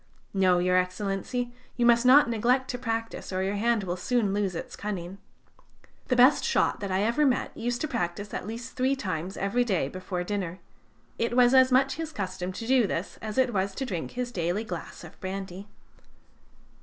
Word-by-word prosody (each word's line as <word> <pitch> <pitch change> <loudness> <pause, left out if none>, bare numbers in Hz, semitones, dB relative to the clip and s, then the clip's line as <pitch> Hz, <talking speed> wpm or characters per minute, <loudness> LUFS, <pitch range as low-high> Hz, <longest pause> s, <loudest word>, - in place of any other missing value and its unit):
No, 185 -2 +4
Your 180 +1 +2
Excellency, 195 +6 -2 0.2
you 240 - +2
must 235 +1 +5
not 280 +2 +8
neglect 245 +3 +1
to 245 - -5
practise, 225 -3 -3
or 185 0 -1
your 195 +1 -1
hand 230 0 +1
will 175 -2 -2
soon 205 +1 0
lose 200 -3 -1
its - - -6
cunning. 195 -2 -5 0.9
The 255 - +2
best 255 +4 +6
shot 470 - +1
that 200 -2 -4
I 190 +2 +1
ever 235 +7 +2
met 265 -4 +1
used 240 +1 -2
to 310 - 0
shoot 205 - -3
at - - -4
least 235 +3 -7
three 260 +2 +2
times 185 - -4
every 205 +6 +1
day 190 - 0
before 185 0 -4
dinner. 185 -2 -3 0.6
It 235 +1 0
was 245 0 +6
as 260 0 +6
much 270 +2 +3
his 325 -1 -4
custom 185 - -4
to 225 +5 -6
do 250 -3 +4
this 175 +1 -4
as 215 +1 -5
it 255 -2 +3
was 195 0 -1
to 270 - -3
drink 180 -9 -4
his 250 -1 -2
daily 175 +2 -1
glass 180 -5 -7
of 170 - -13
brandy." 190 0 -6
210 Hz, 195 wpm, -27 LUFS, 185-245 Hz, 0.9 s, not